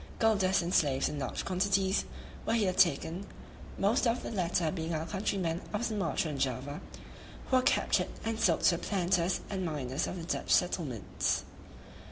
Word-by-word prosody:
Gold 225 Hz, -2 st, +3 dB
dust 185 Hz, -1 st, +2 dB
and 175 Hz, +2 st, -2 dB
slaves 135 Hz, -3 st, +3 dB
in 150 Hz, -, -4 dB
large 130 Hz, -3 st, -3 dB
quantities 195 Hz, +1 st, +1 dB, 0.4 s
were 225 Hz, -, +2 dB
here 200 Hz, -5 st, +2 dB
taken, 185 Hz, 0 st, +2 dB, 0.5 s
most 220 Hz, +5 st, +2 dB
of 230 Hz, +2 st, 0 dB
the -, -, -5 dB
latter 175 Hz, -5 st, 0 dB
being 165 Hz, -2 st, -3 dB
our 155 Hz, +1 st, -2 dB
countrymen 185 Hz, -2 st, -1 dB
of 210 Hz, +3 st, 0 dB
Sumatra 195 Hz, -7 st, -1 dB
and 140 Hz, -, -5 dB
Java, 135 Hz, +2 st, -2 dB, 0.7 s
who 260 Hz, -, +5 dB
are -, -, +4 dB
captured -, -, +2 dB, 0.2 s
and 225 Hz, 0 st, -1 dB
sold 170 Hz, -7 st, +3 dB
to 170 Hz, -, +4 dB
the -, -, -10 dB
planters 185 Hz, -2 st, +1 dB
and 190 Hz, -2 st, -2 dB
miners 145 Hz, -5 st, -2 dB
of -, -, -4 dB
the 170 Hz, -, -6 dB
Dutch -, -, -3 dB
settlements. 135 Hz, -, +1 dB
180 Hz, 175 wpm, -31 LUFS, 160-200 Hz, 0.7 s, who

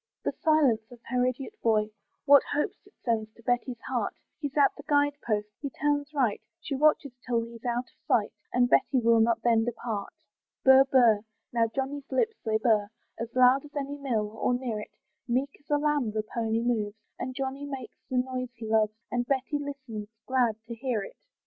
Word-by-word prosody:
The -, -, 0 dB
silence 300 Hz, -8 st, +3 dB
of 245 Hz, -, -11 dB
her 250 Hz, -1 st, +2 dB
idiot 265 Hz, -, -4 dB
boy, 215 Hz, -2 st, +2 dB, 0.3 s
What 285 Hz, -1 st, +8 dB
hopes 295 Hz, +6 st, -2 dB
it 405 Hz, -, -21 dB
sends 220 Hz, -3 st, 0 dB
to 230 Hz, -, -18 dB
Betty's 245 Hz, 0 st, -1 dB
heart! -, -, -1 dB, 0.2 s
He's 285 Hz, -2 st, -4 dB
at 280 Hz, -2 st, +5 dB
the -, -, -9 dB
guide 290 Hz, -1 st, +3 dB
post 210 Hz, -2 st, -1 dB
he 280 Hz, -, -3 dB
turns 290 Hz, +1 st, -1 dB
right, 255 Hz, -8 st, +1 dB, 0.2 s
She 310 Hz, -, -5 dB
watches 290 Hz, 0 st, +3 dB
till 235 Hz, -2 st, +1 dB
he's 230 Hz, 0 st, -11 dB
out 240 Hz, 0 st, 0 dB
of -, -, -40 dB
sight, 215 Hz, 0 st, +2 dB, 0.2 s
And 245 Hz, 0 st, +3 dB
Betty 260 Hz, +2 st, +3 dB
will 230 Hz, -1 st, +4 dB
not 230 Hz, 0 st, +2 dB
then 230 Hz, -2 st, +4 dB
depart. 225 Hz, -3 st, -4 dB, 0.5 s
Burr, 265 Hz, 0 st, +8 dB
burr 245 Hz, -6 st, +5 dB, 0.3 s
now 230 Hz, -1 st, +3 dB
Johnny's 275 Hz, +3 st, -4 dB
lips 445 Hz, +13 st, +2 dB
they 220 Hz, -1 st, +1 dB
burr, 215 Hz, -2 st, +2 dB, 0.3 s
As 230 Hz, -, -3 dB
loud 255 Hz, +2 st, +6 dB
as 295 Hz, 0 st, -14 dB
any 285 Hz, 0 st, -3 dB
mill, 225 Hz, -7 st, -1 dB
or 225 Hz, +3 st, 0 dB
near 245 Hz, -4 st, -3 dB
it, 210 Hz, -, -10 dB, 0.3 s
Meek 260 Hz, +3 st, 0 dB
as 285 Hz, -, -32 dB
a 295 Hz, -, +3 dB
lamb 295 Hz, -5 st, +1 dB
the 215 Hz, 0 st, -2 dB
pony 225 Hz, 0 st, -1 dB
moves, 220 Hz, -3 st, -1 dB, 0.2 s
And 255 Hz, 0 st, -4 dB
Johnny 270 Hz, +1 st, -3 dB
makes 265 Hz, -5 st, -7 dB
the 255 Hz, -, 0 dB
noise 255 Hz, 0 st, -1 dB
he 230 Hz, 0 st, -8 dB
loves, 215 Hz, -1 st, +2 dB, 0.2 s
And 245 Hz, 0 st, -1 dB
Betty 275 Hz, +2 st, 0 dB
listens, 260 Hz, -7 st, -6 dB, 0.2 s
glad 250 Hz, -4 st, +2 dB
to 235 Hz, -, -6 dB
hear 230 Hz, -3 st, -2 dB
it. -, -, -10 dB
245 Hz, 195 wpm, -28 LUFS, 225-275 Hz, 0.5 s, What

